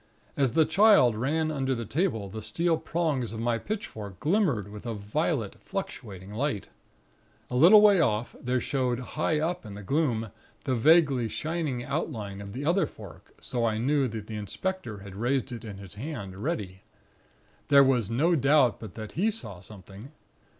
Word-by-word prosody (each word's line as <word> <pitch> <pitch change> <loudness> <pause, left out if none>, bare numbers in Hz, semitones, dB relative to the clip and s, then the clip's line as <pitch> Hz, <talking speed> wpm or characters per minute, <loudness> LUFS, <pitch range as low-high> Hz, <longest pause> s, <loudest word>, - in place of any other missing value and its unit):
As 135 -4 +1
the 160 -1 +5
Child 160 - +5
ran 155 +7 0
under 135 -3 -1
the 115 -1 -4
table, 130 - -1
the 110 +3 -7
steel 165 +11 0
prongs 150 -9 -1
of 110 - -5
my 115 0 0
pitchfork 110 - -6
glimmered 155 - +1
with 105 +3 -9
a 115 - -3
violet, 110 - -2
fluctuating 105 - -6
light. 120 -3 -2 0.8
A - - -2
little 180 +11 +8
way 205 -3 +6
off, 110 -6 0
there 125 +1 0
showed 125 -1 -1
high 155 +4 -1
up 165 +3 -2
in 105 -3 -9
the 105 - -8
gloom, 115 -4 0 0.3
the 130 - 0
vaguely 140 -1 +4
shining 155 -6 -3
outline 110 -9 -4
of 100 0 -8
the 135 +5 -4
other 175 +5 +2
fork, 100 -6 -14
so 120 -2 -2
I 110 -2 +1
knew 135 +3 +2
the 110 -2 -5
inspector 110 - -4
had 100 -1 -10
it - - -10
raised 125 +2 0
in 115 -4 -7
his 100 -1 -11
hand, 105 -6 -6
ready. 100 - -3 0.9
There 140 -1 +7
was 125 -6 +2
no 150 +10 +2
doubt 140 -3 +3
but 110 -5 -9
that 110 -2 -7
he 195 +8 +1
saw 105 - -6
something. 100 +5 -12
125 Hz, 170 wpm, -28 LUFS, 105-155 Hz, 0.9 s, little